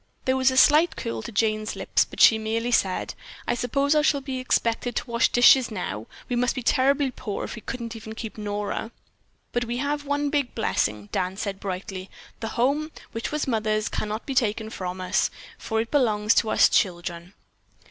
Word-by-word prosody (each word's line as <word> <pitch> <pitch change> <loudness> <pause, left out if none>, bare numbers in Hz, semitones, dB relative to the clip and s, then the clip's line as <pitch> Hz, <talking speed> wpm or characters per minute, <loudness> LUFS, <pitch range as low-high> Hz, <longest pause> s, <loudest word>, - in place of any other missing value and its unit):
There 260 - +2
was 260 0 +4
a 260 - -2
slight 305 +6 +6
curl 115 -1 -4
to - - -7
Jane's 215 0 0
lips, - - +1
but - - -12
she 220 - +7
merely 225 +2 -1
said: 190 -5 +1 0.3
"I - - +2
suppose 275 +4 +1
I 305 - +4
shall 295 -1 +2
be 265 -1 -5
expected 240 -1 0
to - - -1
wash 235 0 +3
dishes 245 +1 +6
now. 115 - -5 0.2
We 245 - -1
must 245 +1 +1
be 255 - -4
terribly 270 +2 +2
poor 210 -5 -5
if - - -5
we 225 - -9
couldn't 235 -2 -5
even 220 0 -8
keep 220 -1 -6
Nora." 210 +1 -3 0.6
"But 240 0 0
we 240 +1 -3
have 290 +2 -1
one 285 0 -1
big 285 -4 -1
blessing," 105 - -1
Dan 185 +1 -2
said 200 -2 -4
brightly, 185 -1 -5 0.3
"the 225 - -4
home, 285 +6 +1 0.2
which 225 0 -4
was 300 -1 -1
mother's 215 -3 0
can 210 - -3
not 215 +2 -4
be 275 - -3
taken 220 -3 0
from 185 -2 -5
us, 185 0 +1 0.3
for 220 -1 -2
it 230 +1 -2
belongs 215 -6 +3
to 220 - +2
us - - +6
children." 175 0 -1
225 Hz, 200 wpm, -25 LUFS, 210-260 Hz, 0.6 s, she